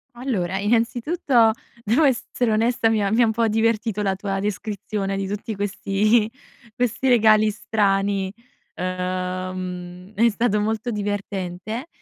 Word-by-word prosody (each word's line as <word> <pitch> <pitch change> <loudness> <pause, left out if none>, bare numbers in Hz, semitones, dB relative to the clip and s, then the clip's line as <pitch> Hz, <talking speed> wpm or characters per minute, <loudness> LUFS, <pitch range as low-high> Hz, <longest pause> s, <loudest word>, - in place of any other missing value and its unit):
Allora, 195 -8 -2
innanzitutto 235 - +2 0.3
devo 235 +9 +3
essere 245 -3 +1
onesta. 225 +1 +2
Mi 215 -2 +1
ha 195 - 0
mi 230 +3 +3
ha - - +6
un 220 - +2
po' 230 +1 +1
divertito 225 -1 +1
la 195 -2 +1
tua 195 0 -3
descrizione 205 0 -3
di 195 0 -2
tutti 210 +2 -4
questi 205 +2 +1 0.5
questi 245 +1 0
regali 215 -3 +5
strani, 200 -2 0 0.4
uhm, 185 0 -4
è 235 +3 +4
stato 215 -1 +1
molto 220 +2 -1
divertente, 205 - -4
210 Hz, 130 wpm, -23 LUFS, 195-230 Hz, 0.5 s, ha